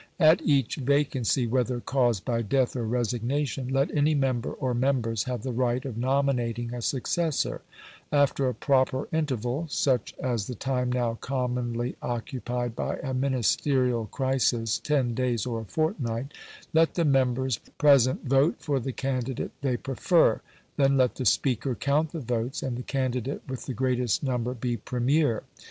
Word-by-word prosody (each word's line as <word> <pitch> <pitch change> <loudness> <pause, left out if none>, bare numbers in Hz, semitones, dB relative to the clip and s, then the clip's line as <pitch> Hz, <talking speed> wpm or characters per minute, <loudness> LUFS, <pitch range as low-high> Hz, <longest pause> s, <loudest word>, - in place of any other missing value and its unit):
At 160 -1 +6
each 140 -5 +1
vacancy, 135 -3 +1
whether 125 +1 0
caused 120 -6 +1
by 115 -2 0
death 130 +4 +1
or 120 -3 -2
resignation, 125 +3 -1
let 135 +3 0
any 150 +1 +3
member 130 -3 0
or 130 -1 -2
members 120 -3 0
have 125 -1 -3
the 130 - -2
right 125 +1 0
of 130 -5 -4
nominating 120 -2 0
a 120 - -4
successor; 145 +5 -1 0.5
after 140 -2 +2
a 125 - -4
proper 130 +1 +1
interval, 140 -1 -1
such 130 -5 0
as 120 -6 -1
the 125 - -5
time 125 +1 -1
now 120 -2 0
commonly 125 -2 -2
occupied 120 0 -3
by - - -2
a 130 -1 -3
Ministerial 130 -2 +1
crisis, 120 -3 0
ten 135 -5 0
days 120 -3 0
or 115 -3 -3
a - - -8
fortnight, 135 - -2 0.4
let 160 +1 +3
the 170 - +2
members 130 -3 +2 0.2
present 140 -4 +4
vote 135 +4 +3
for 140 -3 -1
the 130 +1 -4
candidate 130 -2 -2
they 130 -3 0
prefer; 135 +7 +2 0.4
then 135 -1 +4
let 130 -2 +3
the 130 - -4
Speaker 125 0 +1
count 145 +4 +1
the 165 - -5
votes, 120 +1 -2
and 130 -2 -2
the 125 - -4
candidate 130 0 -2
with 130 -1 -6
the 130 - -3
greatest 125 -1 0
number 125 -2 -1
be 120 0 -2
Premier. 125 0 +1
130 Hz, 155 wpm, -27 LUFS, 120-135 Hz, 0.5 s, At